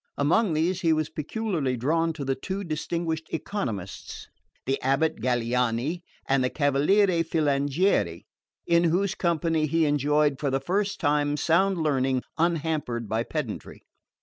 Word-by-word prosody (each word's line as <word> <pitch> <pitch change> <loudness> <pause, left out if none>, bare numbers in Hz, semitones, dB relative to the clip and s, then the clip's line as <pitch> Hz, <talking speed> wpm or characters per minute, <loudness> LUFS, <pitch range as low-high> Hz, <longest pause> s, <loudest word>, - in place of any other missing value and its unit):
Among 170 +7 +2
these, 170 +4 0
he 165 -2 +3
was 155 -1 -1
peculiarly 155 - -2
drawn 165 +7 +1
to 150 -3 -6
the 135 - +1
two 195 +8 -4
distinguished 160 0 -3
economists, 115 - -5 0.4
the 135 +1 0
abate 135 +5 +1
Galiani 125 +5 0 0.3
and 135 -1 +2
the 125 - +1
cavaliere 165 +7 +3
Filangieri, 150 +3 +1 0.4
in 170 0 +3
whose 185 +4 +1
company 165 -4 0
he 165 +2 +2
enjoyed 145 -1 +2
for 145 - 0
the 135 0 0
first 195 +8 -1
time 145 -1 +1
sound 190 +5 +2
learning 130 -3 +1 0.2
unhampered 155 -8 -1
by 110 +2 0
pedantry. 125 -3 -5
155 Hz, 135 wpm, -26 LUFS, 135-170 Hz, 0.4 s, he